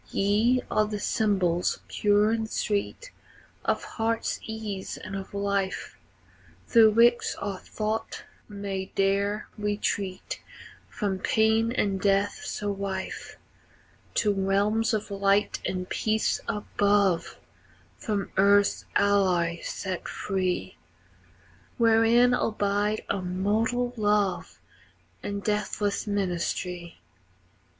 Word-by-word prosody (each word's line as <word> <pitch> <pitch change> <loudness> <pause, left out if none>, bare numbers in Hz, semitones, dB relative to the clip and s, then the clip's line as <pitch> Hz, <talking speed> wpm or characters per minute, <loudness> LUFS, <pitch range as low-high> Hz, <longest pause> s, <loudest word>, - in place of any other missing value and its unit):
Ye 220 +6 +2
are 215 0 +2
the 210 -1 -4
symbols, 190 -6 +1
pure 205 +1 +3
and 225 -1 -1
sweet, 215 - -2 0.5
Of - - 0
heartsease 220 -2 -3
and 195 - -7
of 195 -1 -6
life, 200 -1 -2 0.7
Through 220 -2 +6
which 235 +2 +4
our 200 -2 -4
thought 220 +1 -4 0.3
may 200 -2 -5
dare 200 +2 +1
retreat 205 -2 -2 0.5
From 195 -3 -2
pain 220 +3 +2
and 200 -6 0
death 200 +1 +1
so 205 -1 -3
rife, 195 -1 -5 0.8
To 210 -2 +2
realms 205 +4 +1
of 215 -1 -4
light 200 +1 +2
and 180 -1 -3
peace 220 +2 0
above, 200 -4 +1 0.6
From 205 -3 -2
earth's 200 +1 +4
alloy 185 -4 +2
set 185 -2 -4
free, 185 -2 -2 1.0
Wherein 230 +1 +5
abide 210 -2 0
immortal 210 +6 0
love 205 -3 0 0.6
And 200 0 -4
deathless 210 -1 -1
ministry. 180 -3 -2
205 Hz, 95 wpm, -27 LUFS, 195-215 Hz, 1.0 s, Through